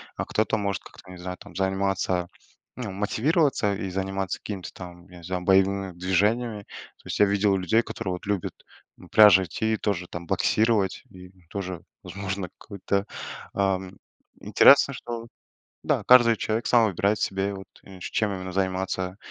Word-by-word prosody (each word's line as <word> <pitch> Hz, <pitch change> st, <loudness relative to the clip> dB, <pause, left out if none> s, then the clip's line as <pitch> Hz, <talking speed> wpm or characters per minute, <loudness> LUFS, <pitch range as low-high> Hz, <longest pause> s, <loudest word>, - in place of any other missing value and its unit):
А -, -, -3 dB
кто-то 110 Hz, +1 st, 0 dB
может 100 Hz, -2 st, -2 dB
как-то, 95 Hz, -, -14 dB
не 90 Hz, -, -10 dB
знаю, 90 Hz, 0 st, -6 dB
там 85 Hz, -, -14 dB
заниматься, 95 Hz, -2 st, 0 dB, 0.5 s
ну, 125 Hz, -4 st, -4 dB
мотивироваться 110 Hz, -, +1 dB
и 95 Hz, -, -4 dB
заниматься 95 Hz, 0 st, -3 dB
какими-то 95 Hz, -6 st, -6 dB
там, 90 Hz, -1 st, -11 dB
я 90 Hz, -, -13 dB
не 85 Hz, -, -14 dB
знаю, 90 Hz, +1 st, -3 dB
боевыми 95 Hz, 0 st, +2 dB
движениями. 105 Hz, +5 st, 0 dB
То -, -, -14 dB
есть -, -, -3 dB
я 105 Hz, -, +7 dB
видел 100 Hz, 0 st, +2 dB
людей, 95 Hz, +5 st, +2 dB
которые 95 Hz, -5 st, -5 dB
вот 90 Hz, -, -7 dB
любят 100 Hz, -3 st, -2 dB, 0.4 s
к -, -, -15 dB
пляжу 105 Hz, -3 st, +8 dB
идти 110 Hz, +6 st, -2 dB
и -, -, 0 dB
тоже 90 Hz, -5 st, -2 dB
там 85 Hz, 0 st, -7 dB
боксировать. 110 Hz, +2 st, +1 dB
И 90 Hz, 0 st, -13 dB, 0.2 s
тоже, 95 Hz, -3 st, -5 dB, 0.2 s
возможно, 95 Hz, -2 st, -5 dB
какой-то, 100 Hz, 0 st, -3 dB, 0.5 s
а 95 Hz, -1 st, +1 dB, 0.7 s
Интересно, 140 Hz, 0 st, +6 dB
что, 115 Hz, -1 st, -6 dB, 0.6 s
да, -, -, +1 dB
каждый 120 Hz, -3 st, +7 dB
человек 110 Hz, +3 st, -2 dB
сам 120 Hz, -2 st, +5 dB
выбирает 100 Hz, +2 st, 0 dB
себе, 95 Hz, +1 st, -1 dB
вот, 95 Hz, 0 st, -10 dB, 0.2 s
и 95 Hz, -1 st, -13 dB
чем 105 Hz, +3 st, -1 dB
именно 95 Hz, 0 st, -6 dB
заниматься, 95 Hz, 0 st, -2 dB
95 Hz, 160 wpm, -25 LUFS, 95-105 Hz, 0.7 s, пляжу